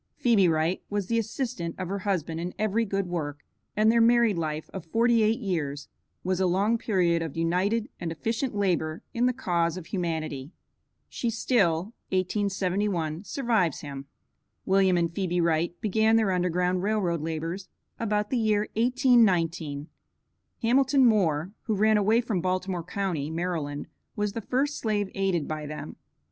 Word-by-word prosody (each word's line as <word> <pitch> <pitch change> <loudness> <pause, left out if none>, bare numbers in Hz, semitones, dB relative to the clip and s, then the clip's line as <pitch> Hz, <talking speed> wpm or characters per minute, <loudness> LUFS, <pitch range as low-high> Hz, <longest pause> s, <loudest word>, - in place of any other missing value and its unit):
Phebe 220 -7 +4
Wright 160 +2 +1
was 205 -1 -1
the 230 0 +2
assistant 220 -7 -3
of 185 - -4
her 200 +2 -3
husband 175 -5 -2
in 175 +2 -4
every 215 +2 +1
good 195 -1 -1
work, 150 -5 -4 0.3
and 215 +1 +5
their 230 0 +4
married 235 -2 +4
life 155 -2 -3
of 190 - -5
forty 230 +7 +2
eight 220 +3 +2
years 155 - -3 0.3
was 185 0 0
a 190 - +3
long 200 +6 +2
period 175 -7 +1
of 165 -2 -5
united 185 +7 +1
and 170 -2 -3
efficient 225 - -2
labor 175 -5 0
in 240 +2 +2
the - - +3
cause 175 -8 0
of 180 - -7
humanity. 160 -6 -3 0.5
She 235 - -2
still 205 -5 +1 0.2
(1871) 190 -3 -1
survives 220 - 0
him. 140 -1 -7 0.6
William 190 -1 +4
and 170 -1 0
Phebe 180 -1 -1
Wright 170 +1 +1
began 220 +2 +3
their 220 -3 +3
Underground 180 0 +1
Rail 215 +3 +1
Road 170 -5 -1
labors 165 +4 -4 0.3
about 210 -2 -1
the 255 - +1
year 215 -2 +2
1819. 180 - +2 0.8
Hamilton 265 +3 +4
Moore, 180 -7 +2
who 220 - 0
ran 215 +2 +4
away 215 +3 +3
from 220 -7 -1
Baltimore 185 -1 -1
county, 175 -5 -2
Maryland, 160 -4 -3 0.3
was 210 -1 -1
the 230 - -4
first 275 +6 -1
slave 205 -3 -1
aided 190 -6 0
by 155 -1 -4
them. 150 +1 -7
185 Hz, 155 wpm, -27 LUFS, 165-220 Hz, 0.8 s, and